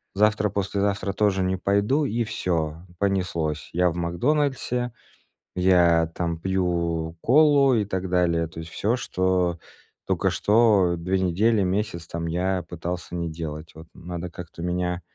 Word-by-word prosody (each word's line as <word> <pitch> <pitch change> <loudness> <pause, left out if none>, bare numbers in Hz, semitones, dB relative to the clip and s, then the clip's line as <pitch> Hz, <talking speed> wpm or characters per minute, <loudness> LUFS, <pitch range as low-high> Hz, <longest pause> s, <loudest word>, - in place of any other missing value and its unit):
завтра-послезавтра 100 -1 +1
тоже 100 -1 +1
не 95 0 0
пойду". 100 +10 +1
И 120 -2 0
всё, 85 -5 -2
понеслось. 90 -6 -1
Я 90 +1 +3
в 85 - -5
"Макдональдсе", 125 - 0 0.6
я 90 -3 +4
там 85 -2 -2
пью 85 -3 -1
колу 140 0 +5
и 110 -4 +2
так 95 -1 -3
далее, 85 -2 +2
то 80 +1 -10
есть 80 0 -8
всё, 110 +4 0
что 90 -6 0 0.5
только - - +1
что 105 -5 +3
2 90 +3 -1
недели, 100 +4 +2
месяц 95 -2 -2
там 85 0 -4
я 90 +2 -1
пытался 85 +1 -5
не 85 -1 -2
делать. 80 -1 -6
Вот 80 +1 -12
надо 90 0 -6
как-то 85 -1 -10
меня 90 0 -1
90 Hz, 140 wpm, -24 LUFS, 85-100 Hz, 0.6 s, колу